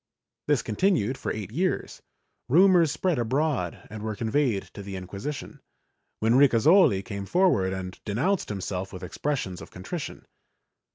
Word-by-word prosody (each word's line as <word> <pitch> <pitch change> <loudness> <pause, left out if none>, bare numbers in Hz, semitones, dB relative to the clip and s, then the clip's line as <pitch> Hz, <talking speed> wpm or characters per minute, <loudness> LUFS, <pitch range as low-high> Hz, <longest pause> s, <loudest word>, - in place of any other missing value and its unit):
This 145 -4 +2
continued 130 - +1
for - - -4
eight 105 -2 -5
years; 180 +9 -2 0.5
rumors 175 +1 +5
spread 180 -7 0
abroad 130 - -1
and 110 -1 -7
were 110 0 -3
conveyed 115 -2 0
to - - -8
the 100 -1 -7
Inquisi 100 +9 -5
tion, 150 - -9 0.6
when 110 +2 +3
Ricasoli 135 - +5
came 100 -3 -5
forward 170 - +3
and 95 -1 -5
denounced 165 - 0
himself 95 -1 -4
with 95 -1 -9
expressions 105 -1 -3
of - - -10
contrition. 140 - -7
115 Hz, 140 wpm, -26 LUFS, 100-150 Hz, 0.6 s, rumors